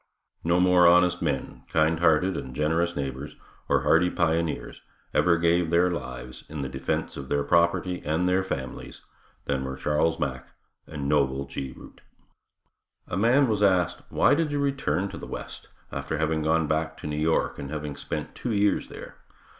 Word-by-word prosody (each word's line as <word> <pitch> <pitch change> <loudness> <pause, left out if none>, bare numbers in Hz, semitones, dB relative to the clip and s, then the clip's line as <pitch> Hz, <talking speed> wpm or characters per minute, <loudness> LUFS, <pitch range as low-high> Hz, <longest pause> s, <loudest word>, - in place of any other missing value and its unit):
No 85 +2 +2
more 90 -1 +5
honest 90 0 +4
men, 70 -5 -2
kindhearted 80 +3 +3
and 65 -4 -6
generous 80 +4 0
neighbors, 70 +1 -5 0.3
or - - +3
hardy 90 +2 +4
pioneers, 85 -2 -1 0.3
ever 85 -2 +4
gave 85 0 +2
their 85 +2 +3
lives 65 -6 -6
in 75 -2 -5
the 65 - -4
defense 65 0 -3
of 70 -1 -7
their 70 0 +1
property 85 +3 +2
and 80 +4 0
their 90 +1 +3
families, 65 -8 -6 0.4
than 65 -2 -1
were 65 0 -4
Charles 75 +4 0
Mack 65 -1 -4 0.3
and 70 -3 -5
Noble 70 -2 +1
G. 70 -1 -6
Root. - - -14 1.1
A - - -4
man 120 +8 +4
was 105 -3 0
asked, 95 -4 +2
why - - +4
did 155 0 +1
you 145 - -1
return 140 -9 0
to - - -8
the - - -8
west, - - -8 0.2
after 80 - -3
having 80 0 0
gone 80 +1 +2
back 80 +1 -1
to - - -10
New 75 0 -3
York 80 +2 0
and 70 - -6
having 75 -1 -5
spent 70 - -5
two 120 - -3
years 105 0 +2
there? - - -10
80 Hz, 170 wpm, -26 LUFS, 70-90 Hz, 1.1 s, more